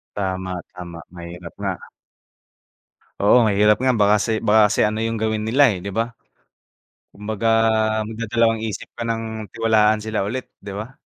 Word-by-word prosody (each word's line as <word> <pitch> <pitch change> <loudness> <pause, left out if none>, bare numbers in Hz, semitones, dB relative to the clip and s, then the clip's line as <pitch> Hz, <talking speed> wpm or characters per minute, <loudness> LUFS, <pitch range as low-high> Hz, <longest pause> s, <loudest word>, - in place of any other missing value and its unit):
Tama, 95 -2 -3 0.2
tama 85 -2 -8
mahirap 85 0 -9
nga. - - 0 1.5
Oo 120 +4 +6
mahirap 105 +1 +3
nga 130 - +2
baka 105 0 +4
kasi 110 -1 0
baka 105 -1 +5
kasi - - +2
ano 110 +1 -1
yung 115 0 -1
gawin 110 0 -1
nila, 120 +2 +4
eh, 90 - -6
'di 100 - -5
ba. 115 +4 -2 1.0
Kumbaga 105 +2 -3 0.6
magdadalawang-isip 115 -1 -1
ka 115 - -3
ng 115 0 -1 0.3
tiwalaan 110 -1 +3
sila 110 -3 -2
ulit 130 +3 -4
'di 100 0 -8
ba. 120 +5 -8
110 Hz, 145 wpm, -21 LUFS, 100-115 Hz, 1.5 s, Oo